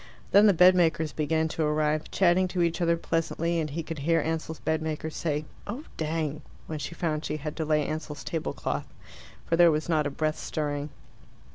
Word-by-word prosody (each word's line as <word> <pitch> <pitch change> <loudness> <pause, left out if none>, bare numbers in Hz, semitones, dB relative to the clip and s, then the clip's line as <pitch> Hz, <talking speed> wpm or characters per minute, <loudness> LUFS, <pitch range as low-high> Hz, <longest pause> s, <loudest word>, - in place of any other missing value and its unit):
Then 205 +2 +7
the 205 - +6
bedmakers 165 -4 +4
began 160 +1 +1
to 160 - -3
arrive, 150 0 +1
chatting 185 0 +3
to 180 -1 0
each 170 +1 0
other 170 0 +3
pleasantly, 165 +1 -1
and 155 -1 -1
he 165 +4 -4
could 160 -1 -6
hear 165 +3 +2
Ansell's 160 0 -2
bedmaker 160 0 -2
say, 150 -1 -2 0.2
"Oh 235 +9 -5
dang!" 155 -1 -2 0.2
when 155 -1 -5
she 145 +4 -5
found 155 -3 -1
she 150 0 -2
had 150 0 -5
to 160 - -1
lay 150 -1 +2
Ansell's 155 -2 -5
tablecloth; 165 -2 -3 0.5
for 165 - +1
there 170 0 +7
was 155 -1 0
not 155 -3 +2
a - - -1
breath 155 +2 -1
stirring. 145 -1 -3
160 Hz, 185 wpm, -27 LUFS, 150-170 Hz, 0.5 s, Then